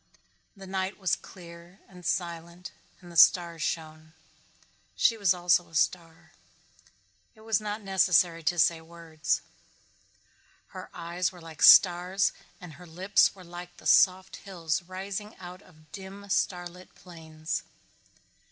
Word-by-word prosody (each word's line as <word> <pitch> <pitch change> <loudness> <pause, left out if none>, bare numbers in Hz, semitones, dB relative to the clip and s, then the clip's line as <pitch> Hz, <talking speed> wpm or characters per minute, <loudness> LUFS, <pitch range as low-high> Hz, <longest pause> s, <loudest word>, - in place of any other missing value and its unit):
The 195 - -11
night 190 +1 -3
was 190 -3 0
clear 170 0 -14
and 180 -1 -15
silent 170 0 -4 0.3
and 175 -1 -13
the - - -13
stars 170 -1 +4
shone. 155 0 -5 0.8
She 230 - +3
also 185 -4 +1
was 175 0 +4
a 170 -2 -17
star. 165 -2 -3 1.0
It 220 - -19
was 220 -1 0
not 210 0 -5
necessary 180 -3 +2
to 175 -1 +1
say 165 0 +3
words. 165 -1 -3 1.3
Her - - -10
eyes 175 +2 -3
were 180 - -14
like 165 -2 -12
stars 180 +1 +6 0.3
and 180 -4 -11
her 175 +5 -14
lips 190 +6 +2
were 185 - -14
like 175 0 -11
soft 185 0 +3
hills 170 -4 -3
rising 195 +4 -7
out 180 +1 -11
of 155 -5 -22
dim, 200 +1 -10
star 180 -2 0
lit 180 +1 -16
plains. 160 -2 -7
175 Hz, 135 wpm, -27 LUFS, 165-190 Hz, 1.3 s, stars